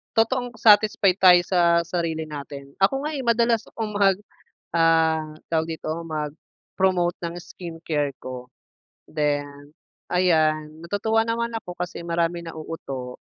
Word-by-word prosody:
totoong 245 +2 +1
satisfied 205 -3 +5
tayo 180 -2 +8
sa 170 -2 +4
sarili 165 -3 -2
natin. 140 -2 -8
Ako 270 +8 +2
nga 305 - -2
eh 270 - -3
madalas 235 -1 +2
akong 220 -2 -5
mag 195 -2 +4 0.6
ah, 160 -2 +3 0.2
tawag 160 -1 +1
dito, 155 - -4
mag-promote 165 +3 -2
ng 170 0 -3
skincare 165 -5 -4
ko, 125 -1 -7 0.6
then 145 -1 -2 0.4
ayan, 155 -3 +1
natutuwa 220 +5 +1
naman 235 +1 -1
ako 195 -5 -6
kasi 175 -1 -5
maraming 170 0 -1
nauuto. 140 -6 -6
170 Hz, 120 wpm, -24 LUFS, 155-200 Hz, 0.6 s, tayo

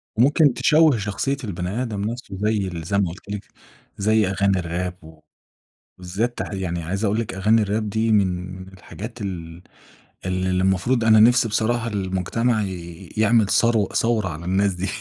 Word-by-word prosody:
وممكن 140 +3 +4
تشوَّه 150 0 +4
شخصية 105 +7 -2
البني 95 +3 -3
آدم 105 -5 -3
نفسه، 110 -3 -5
زي 105 -2 +1
ال 85 -2 -6
زي 100 +5 -1
ما 95 -4 +2
قُلت 95 +3 -11
لك، 105 -1 -5 0.5
زي 110 0 +2
أغاني 100 0 +1
الراب 90 +1 -3
و 80 0 -14 0.8
بالذات 100 +7 -3
يعني 90 -3 -3
عايزة 95 +6 -2
أقول 105 +3 +1
لِك 110 - -4
أغاني 105 +3 +3
الراب 105 +1 -1
دي 110 +1 +1
من 95 -2 0
الحاجات 105 +5 -10
ال 85 -3 -6 0.6
ال 95 0 -1
المفروض 95 +6 +1
أنا 110 -1 +6
نفسي 120 +1 +5
بصراحة، 115 +2 0
المجتمع 105 +3 -1 0.5
يعمَل 110 -1 +4
ثرو 115 -4 +3
ثورة 110 -5 0
على 80 +2 -7
الناس 95 +1 +1
دي. 90 +3 -3
100 Hz, 155 wpm, -22 LUFS, 95-115 Hz, 0.8 s, أنا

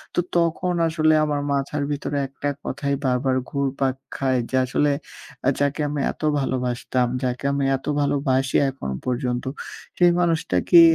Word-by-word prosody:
তো - - +2 0.2
তখন 170 +2 +1
আসলে 155 -1 +3
আমার 145 -1 -1
মাথার 140 +1 -1
ভিতরে 145 0 -2
একটা 140 +2 -4
কথাই 140 +1 -2
বারবার 130 +1 +1 0.2
ঘুরপাক 135 -1 0 0.2
খায়। 130 -2 +1
যে 130 - -2
আসলে 145 +3 +1 0.6
আ - - +7
যাকে 145 +2 0
আমি 145 -1 -2
এত - - -16 0.2
ভালোবাসতাম, 125 -1 0 0.2
যাকে 125 +1 -2
আমি 140 0 0
এত 135 - -16 0.2
ভালোবাসি 135 -2 +1
এখনও 65 - -5
পর্যন্ত। 125 -1 -1 0.5
সেই 175 -1 +6
মানুষটা 165 - +1
কি 170 -1 +9
140 Hz, 150 wpm, -23 LUFS, 130-145 Hz, 0.6 s, কি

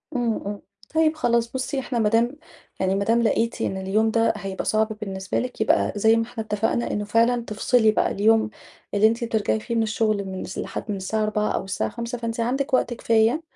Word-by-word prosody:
امم، 235 -3 0
امم، 205 0 -5 0.3
طيّب 320 0 +3
خلاص 235 -5 +1
بُصّي 260 +2 -2
إحنا 250 -2 -2
ما 215 -2 +3
دام 235 +5 +2 0.4
يعني 190 0 +1
ما 200 - 0
دام 230 +3 +2
لقيتِ 230 0 0
إن 190 - -1
اليوم 205 +4 +1
ده 225 0 +2
هيبقى 195 -1 -5
صعب 215 0 +2
بالنسبة 190 -2 -3
لِك 250 -2 -4
يبقى 220 - +2
زي 220 +2 +4
ما 230 - +1
إحنا 225 -1 -6
اتّفقنا 220 +2 -1
إنّه 205 0 -2
فعلًا 230 +3 +2
تفصلي 220 +1 +3
بقى - - +1
اليوم 220 +2 +3 0.4
اللي 205 +1 +5
أنتِ 230 +2 -1
بترجعي 220 -2 0
فيه 235 +2 -4
من 225 - +2
الشغل 215 -2 0
من 190 -1 -5
س 190 - -8
لحد - - -4
من 200 - -2
الساعة 215 +3 -1
16:00 215 0 0
أو - - -1
الساعة 190 - -2
17:00 235 +1 -5
فأنتِ 230 0 -4
عندِك 265 +4 -1
وقت 245 -2 +2
كفاية، 230 +4 +2
225 Hz, 215 wpm, -24 LUFS, 210-235 Hz, 0.4 s, اللي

